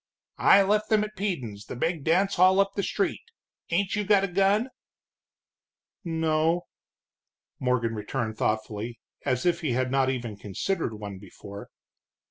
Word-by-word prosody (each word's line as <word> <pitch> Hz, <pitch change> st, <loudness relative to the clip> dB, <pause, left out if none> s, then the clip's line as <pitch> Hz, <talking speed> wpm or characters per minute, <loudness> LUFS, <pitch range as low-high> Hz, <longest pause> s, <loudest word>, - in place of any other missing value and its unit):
"I 195 Hz, -, +7 dB
left 210 Hz, +2 st, +1 dB
them 215 Hz, -1 st, +4 dB
at 215 Hz, 0 st, -6 dB
Peden's, 130 Hz, -, -3 dB
the -, -, -7 dB
big 160 Hz, +4 st, -1 dB
dance 190 Hz, +6 st, +2 dB
hall 185 Hz, +2 st, +5 dB
up 195 Hz, 0 st, +3 dB
the 200 Hz, -, -1 dB
street. -, -, -1 dB, 0.5 s
Ain't 190 Hz, +4 st, +1 dB
you 210 Hz, -, 0 dB
got 200 Hz, -1 st, +4 dB
a -, -, +1 dB
gun?" 195 Hz, +6 st, +2 dB, 1.3 s
"No," 160 Hz, 0 st, +1 dB, 1.0 s
Morgan 125 Hz, -3 st, +1 dB
returned 110 Hz, +1 st, -3 dB
thoughtfully, 110 Hz, +2 st, -2 dB, 0.3 s
as 125 Hz, +4 st, 0 dB
if 175 Hz, 0 st, +2 dB
he 150 Hz, -7 st, 0 dB
had 130 Hz, +1 st, 0 dB
not 135 Hz, -1 st, +2 dB
even 120 Hz, -5 st, -3 dB
considered 115 Hz, -, -2 dB
one 100 Hz, -2 st, -7 dB
before. 100 Hz, +1 st, -11 dB
160 Hz, 145 wpm, -27 LUFS, -, 1.3 s, I